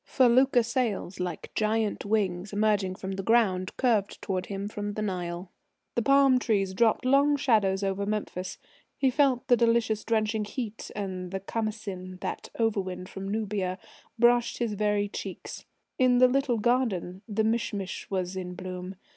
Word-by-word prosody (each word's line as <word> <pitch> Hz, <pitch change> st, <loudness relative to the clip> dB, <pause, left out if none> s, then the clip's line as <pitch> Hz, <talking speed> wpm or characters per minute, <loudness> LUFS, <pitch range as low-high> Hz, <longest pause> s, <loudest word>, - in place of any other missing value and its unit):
Felucca 255 Hz, -1 st, +4 dB
sails, 225 Hz, -6 st, -2 dB
like 180 Hz, -3 st, -4 dB
giant 215 Hz, -1 st, 0 dB
wings 195 Hz, -3 st, 0 dB
emerging 205 Hz, -3 st, +1 dB
from 190 Hz, 0 st, -6 dB
the 195 Hz, 0 st, -3 dB
ground, 195 Hz, -4 st, +2 dB
curved 220 Hz, -6 st, +1 dB
towards 185 Hz, -2 st, -3 dB
him 200 Hz, 0 st, -4 dB
from 205 Hz, 0 st, -4 dB
the 215 Hz, -, -4 dB
Nile. 180 Hz, -2 st, -4 dB, 0.4 s
The 235 Hz, -, +1 dB
palm 275 Hz, +1 st, +5 dB
trees 195 Hz, -5 st, 0 dB
dropped 225 Hz, +4 st, +2 dB
long 280 Hz, +2 st, +4 dB
shadows 205 Hz, -7 st, +2 dB
over 195 Hz, +1 st, -1 dB
Memphis. 205 Hz, -3 st, -3 dB, 0.4 s
He 265 Hz, -2 st, +2 dB
felt 265 Hz, -2 st, +2 dB
the 250 Hz, -, +6 dB
delicious, 230 Hz, -2 st, +2 dB
drenching 220 Hz, -1 st, 0 dB
heat, 225 Hz, -1 st, -5 dB
and 185 Hz, -3 st, -4 dB
the 195 Hz, +1 st, -3 dB
Khamasin, 195 Hz, -3 st, -4 dB
that -, -, -4 dB
over 225 Hz, -3 st, +1 dB
wind 185 Hz, 0 st, -6 dB
from 195 Hz, +1 st, -6 dB
Nubia, 200 Hz, -3 st, -2 dB, 0.4 s
brushed 240 Hz, 0 st, +3 dB
his 235 Hz, -3 st, -1 dB
very 205 Hz, 0 st, +1 dB
cheeks. -, -, -7 dB, 0.3 s
In 255 Hz, -1 st, +5 dB
the 255 Hz, +1 st, +7 dB
little 265 Hz, -1 st, +1 dB
gardens 210 Hz, -6 st, 0 dB
the 220 Hz, 0 st, 0 dB
mish 225 Hz, +2 st, 0 dB
mish 195 Hz, -3 st, -5 dB
was 185 Hz, -1 st, -2 dB
in 180 Hz, -1 st, -5 dB
bloom.... 185 Hz, +1 st, -6 dB
210 Hz, 160 wpm, -28 LUFS, 190-235 Hz, 0.4 s, the